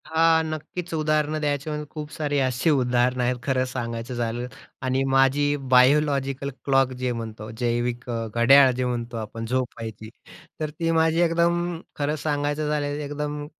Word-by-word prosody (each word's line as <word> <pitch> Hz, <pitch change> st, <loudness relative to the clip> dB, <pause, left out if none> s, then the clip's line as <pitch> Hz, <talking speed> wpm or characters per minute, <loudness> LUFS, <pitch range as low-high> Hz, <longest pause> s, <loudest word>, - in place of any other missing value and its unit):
हां, 160 Hz, 0 st, +3 dB
नक्कीच 160 Hz, +3 st, -5 dB
उदाहरणं 155 Hz, -1 st, +1 dB
द्यायचं 145 Hz, 0 st, -1 dB
म्हणजे 150 Hz, 0 st, -4 dB
खूप 150 Hz, -1 st, -7 dB
सारी 145 Hz, -3 st, -2 dB
अशी 130 Hz, +3 st, +1 dB
उदाहरणं 125 Hz, -2 st, +2 dB
आहेत 125 Hz, +1 st, +1 dB
खरं 130 Hz, -2 st, +1 dB
सांगायचं 120 Hz, -1 st, -4 dB
झालं 120 Hz, 0 st, -2 dB, 0.4 s
आणि 130 Hz, +1 st, +1 dB
माझी 135 Hz, +2 st, +3 dB, 0.2 s
बायोलॉजिकल 140 Hz, +1 st, +3 dB, 0.2 s
क्लॉक 135 Hz, -2 st, +3 dB
जे 125 Hz, -1 st, 0 dB
म्हणतो, 110 Hz, -2 st, -6 dB
जैविक 120 Hz, 0 st, -1 dB
अ, 115 Hz, -1 st, -2 dB
घड्याळ 135 Hz, +3 st, +7 dB
जे 130 Hz, 0 st, -1 dB
म्हणतो 120 Hz, -1 st, -3 dB
आपण 115 Hz, +1 st, -5 dB
झोपायची, 115 Hz, -3 st, -4 dB, 0.5 s
तर 155 Hz, -1 st, -2 dB
ती 165 Hz, -1 st, +1 dB
माझी 160 Hz, +1 st, +3 dB
एकदम 170 Hz, 0 st, +1 dB, 0.2 s
खरं 150 Hz, +1 st, -1 dB
सांगायचं 145 Hz, 0 st, -1 dB
झालं 150 Hz, -1 st, 0 dB
एकदम 145 Hz, 0 st, -4 dB
140 Hz, 150 wpm, -24 LUFS, 125-150 Hz, 0.5 s, घड्याळ